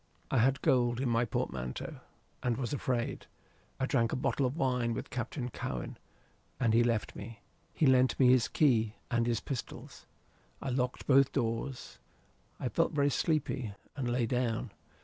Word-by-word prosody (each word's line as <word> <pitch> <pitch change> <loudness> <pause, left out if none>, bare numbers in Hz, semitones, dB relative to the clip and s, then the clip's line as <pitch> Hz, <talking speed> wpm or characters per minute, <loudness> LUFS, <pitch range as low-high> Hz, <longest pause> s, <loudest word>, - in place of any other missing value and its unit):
"I 135 - +3
had 135 +4 +2
gold 120 -2 +3
in 130 -1 0
my 115 +1 +2
portmanteau, 65 - -3 0.4
and 120 -2 0
was 130 +1 -2
afraid. 125 -3 -2 0.5
I 130 - +1
drank 115 -4 +1
a - - 0
bottle 130 +1 +1
of 130 +5 -5
wine 125 -6 +1
with - - -6
Captain 125 +1 -3
Cowen, 60 - -5 0.6
and 115 -4 +2
he 115 +1 +5
left 115 -3 0
me. 110 +2 -9 0.3
He 160 - +1
lent 130 -1 +4
me 130 -2 +6
his 125 -2 +5
key 115 -7 +2 0.2
and 120 0 +2
his 115 -3 0
pistols. 135 -4 -7 0.5
I 135 - -4
locked 125 0 -1
both 135 -1 +5
doors. 115 - -3 0.6
I - - -2
felt - - +1
very 145 -1 +2
sleepy, 135 -9 -1 0.2
and 130 -3 -2
lay 120 0 +1
down. 120 -1 -1
125 Hz, 165 wpm, -31 LUFS, 115-130 Hz, 0.6 s, me